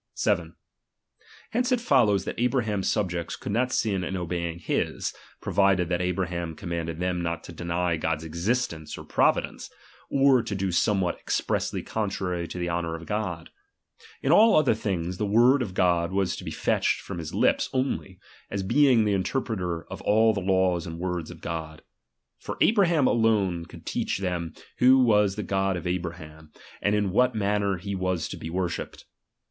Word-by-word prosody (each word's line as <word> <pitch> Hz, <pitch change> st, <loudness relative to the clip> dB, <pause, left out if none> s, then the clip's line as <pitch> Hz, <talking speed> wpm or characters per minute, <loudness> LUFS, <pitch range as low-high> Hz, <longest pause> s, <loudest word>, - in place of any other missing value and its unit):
7 -, -, 0 dB, 1.0 s
Hence 245 Hz, +2 st, 0 dB
it 250 Hz, -, +3 dB
follows, 115 Hz, -, +3 dB
that -, -, -5 dB
Abraham's 115 Hz, -6 st, 0 dB
subjects 90 Hz, -5 st, -1 dB
:*^*" -, -, -14 dB
ia.™is, -, -, -24 dB
could -, -, -5 dB
not 125 Hz, +4 st, +1 dB
sin 100 Hz, -7 st, 0 dB
in 95 Hz, +1 st, -3 dB
obeying 85 Hz, -1 st, -3 dB
him, 85 Hz, -, -1 dB, 0.4 s
provided 95 Hz, -3 st, +2 dB
that 90 Hz, -1 st, 0 dB
Abra^ -, -, -2 dB
in 90 Hz, -, 0 dB
in 90 Hz, -, -2 dB
oboj 95 Hz, -2 st, 0 dB
ham 85 Hz, -2 st, -4 dB
commanded 85 Hz, -1 st, -4 dB
them 90 Hz, -1 st, -1 dB
not 85 Hz, -1 st, -3 dB
to -, -, -9 dB
deny 85 Hz, 0 st, -1 dB
God's 80 Hz, 0 st, -1 dB
existence 85 Hz, 0 st, -2 dB
or -, -, -8 dB
providence, -, -, 0 dB, 0.4 s
or 135 Hz, -2 st, +4 dB
to 110 Hz, -3 st, -4 dB
do 95 Hz, -1 st, -1 dB
somewhat 95 Hz, 0 st, +1 dB
expressly -, -, -1 dB
con 110 Hz, -2 st, -2 dB
trary 90 Hz, -3 st, -3 dB
to -, -, -6 dB
the 90 Hz, 0 st, -2 dB
honour 85 Hz, -1 st, -2 dB
of 85 Hz, 0 st, -9 dB
God. 90 Hz, -6 st, -3 dB, 0.7 s
In 135 Hz, -, +2 dB
all 220 Hz, +6 st, +7 dB
other 155 Hz, -6 st, +4 dB
things, 90 Hz, -5 st, -3 dB
the 105 Hz, -, 0 dB
word 120 Hz, +6 st, +5 dB
of 95 Hz, -7 st, -4 dB
God 85 Hz, -1 st, +2 dB
was 95 Hz, -1 st, 0 dB
to -, -, -8 dB
be -, -, -5 dB
fetched -, -, 0 dB
from 95 Hz, -3 st, -6 dB
his 80 Hz, -2 st, -6 dB
lips -, -, +2 dB
only, 130 Hz, -8 st, -2 dB, 0.3 s
as 100 Hz, -, -3 dB
being 125 Hz, +1 st, +4 dB
the 105 Hz, -, +2 dB
interpreter 95 Hz, -4 st, -2 dB
of -, -, -9 dB
all 110 Hz, +1 st, +4 dB
the 100 Hz, -, -2 dB
laws 95 Hz, -2 st, +1 dB
and 80 Hz, 0 st, -6 dB
words 90 Hz, -2 st, -3 dB
of 85 Hz, -2 st, -11 dB
God. 80 Hz, -2 st, -5 dB, 0.6 s
For -, -, -6 dB
Abraham 175 Hz, -, +4 dB
alone 105 Hz, -8 st, +2 dB
could -, -, -13 dB
teach -, -, -1 dB
them 90 Hz, -4 st, -3 dB, 0.2 s
who 130 Hz, +2 st, +7 dB
was 105 Hz, -6 st, +4 dB
the 105 Hz, -, -3 dB
God 95 Hz, -1 st, 0 dB
of 85 Hz, -, -7 dB
Abraham, 85 Hz, -3 st, -5 dB, 0.3 s
and 105 Hz, 0 st, +2 dB
in 105 Hz, -2 st, 0 dB
what 125 Hz, +4 st, +3 dB
manner 100 Hz, -2 st, 0 dB
he 100 Hz, +3 st, -5 dB
was 95 Hz, -3 st, -1 dB
to -, -, -5 dB
be 80 Hz, -, -6 dB
worshipped. 90 Hz, 0 st, -4 dB
95 Hz, 185 wpm, -26 LUFS, 85-110 Hz, 1.0 s, all